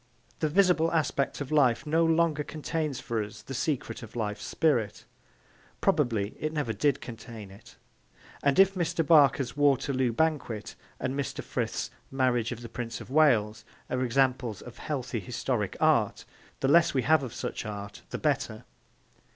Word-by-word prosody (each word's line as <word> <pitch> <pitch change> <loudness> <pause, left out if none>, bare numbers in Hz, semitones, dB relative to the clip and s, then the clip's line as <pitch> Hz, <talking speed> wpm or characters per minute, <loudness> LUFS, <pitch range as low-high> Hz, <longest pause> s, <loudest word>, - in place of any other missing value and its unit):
The 155 - +1
visible 180 -1 +3
aspect 145 -3 0
of 145 - -5
life 135 -6 +3
no 160 +2 +2
longer 165 -2 +2
contains 155 -2 -3
for 115 -3 -2
us 105 0 -10
the 135 - -7
secret 135 +2 -2
of 115 -1 -11
life's 105 -3 -3
spirit. 115 -10 0 0.7
Probably 120 - +1
it 155 - -2
never 150 -8 -2
did 140 +6 +1
contain 115 -3 -9
it. 100 - -15 0.7
And, 140 -1 +2
if 195 0 +6
Mr. 170 -3 -1
Barker's 140 -5 +4
Waterloo 135 -3 +2
Banquet 125 -6 -1 0.3
and 130 - -2
Mr. 140 -1 -3
Frith's - - -3 0.2
Marriage 125 -3 +1
of 120 -1 -6
the - - -6
Prince 115 0 -5
of - - -11
Wales 115 -8 +3 0.3
are 125 0 0
examples 125 -3 0
of - - -11
healthy - - -3
historic - - -2
art, - - +2 0.4
the 135 - +2
less 165 +1 +5
we 130 - +2
have 155 +3 +4
of 130 -4 -5
such - - -4
art 105 -1 -7
the - - -4
better. - - -1
135 Hz, 160 wpm, -28 LUFS, 115-155 Hz, 0.7 s, if